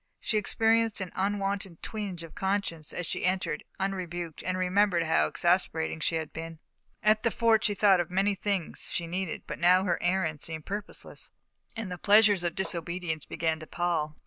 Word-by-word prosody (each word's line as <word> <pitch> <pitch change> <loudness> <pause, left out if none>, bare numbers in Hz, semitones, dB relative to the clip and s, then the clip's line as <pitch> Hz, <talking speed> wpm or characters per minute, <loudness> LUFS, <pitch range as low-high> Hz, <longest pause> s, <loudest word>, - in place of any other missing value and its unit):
She 215 - 0
experienced 225 +1 +2
an 190 -2 -4
unwonted 195 -2 -2
twinge 200 -6 -5
of 165 - -11
conscience 190 -5 -2
as 180 - -4
she - - -3
entered, 180 -4 0 0.2
unrebuked, 175 -4 -3
and 185 0 -2
remembered 185 -1 +2
how 155 - +3
exasperating 80 +1 +1
she 165 - 0
had 160 -2 -3
been. 165 0 -7 0.5
At 215 0 +4
the 230 - +2
Fort 230 -1 +3
she 210 - +2
had - - -11
thought 195 -3 +5
of 175 - -1
many 195 +3 +2
things 195 -3 -1
she 170 - -2
needed, 180 0 -3
but - - -6
now 180 +2 +5
her 185 - 0
errand 175 -4 0
seemed 160 -2 -3
purposeless, 205 +1 -6 0.5
and 225 -5 -5
the 180 - -5
pleasures 205 -3 +5
of 170 -1 -1
disobedience 170 -3 -2
began 160 -1 -1
to 155 - -10
pall. 160 -4 -1
185 Hz, 180 wpm, -29 LUFS, 165-200 Hz, 0.5 s, thought